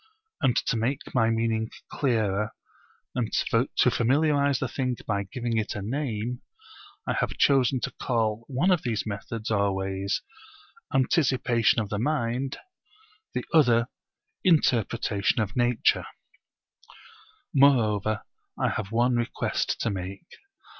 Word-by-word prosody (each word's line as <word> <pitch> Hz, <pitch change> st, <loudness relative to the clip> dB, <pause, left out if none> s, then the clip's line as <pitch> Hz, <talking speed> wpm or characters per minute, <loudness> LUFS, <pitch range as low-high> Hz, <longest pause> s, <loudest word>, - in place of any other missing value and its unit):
And 130 Hz, -5 st, +3 dB
to 115 Hz, -, +1 dB
make 125 Hz, +5 st, -2 dB
my 115 Hz, -3 st, +3 dB
meaning 115 Hz, 0 st, 0 dB, 0.2 s
clearer 110 Hz, -6 st, 0 dB, 0.6 s
and 120 Hz, -3 st, -2 dB, 0.4 s
to 125 Hz, -, +4 dB
familiarise 140 Hz, +4 st, +2 dB
the 130 Hz, -, -2 dB
thing 125 Hz, -1 st, -2 dB
by 100 Hz, -1 st, -1 dB
giving 120 Hz, -3 st, -2 dB
it 110 Hz, -, -1 dB
a 105 Hz, -, -4 dB
name, 120 Hz, -1 st, -3 dB, 0.6 s
I -, -, 0 dB
have -, -, -2 dB
chosen 130 Hz, -2 st, +3 dB
to -, -, -2 dB
call 115 Hz, -2 st, 0 dB
one 140 Hz, +8 st, +1 dB
of 175 Hz, -3 st, +3 dB
these 110 Hz, -6 st, -2 dB
methods 110 Hz, +2 st, -5 dB
or 100 Hz, -2 st, +2 dB
ways 95 Hz, +1 st, -2 dB, 0.7 s
Anticipation 130 Hz, -5 st, +2 dB
of 105 Hz, -3 st, -2 dB
the 105 Hz, -, -2 dB
Mind, 130 Hz, -1 st, -1 dB, 0.8 s
the -, -, -2 dB
other 120 Hz, -6 st, +4 dB, 0.5 s
Interpretation 120 Hz, -, +2 dB
of 110 Hz, -1 st, -2 dB
Nature. 120 Hz, -1 st, +2 dB, 1.5 s
Moreover 110 Hz, -, +3 dB, 0.4 s
I -, -, +2 dB
have 100 Hz, -2 st, -4 dB
one 120 Hz, +2 st, +2 dB
request 120 Hz, 0 st, -1 dB
to 115 Hz, -, 0 dB
make. 95 Hz, -, -6 dB
115 Hz, 125 wpm, -26 LUFS, 110-130 Hz, 1.5 s, to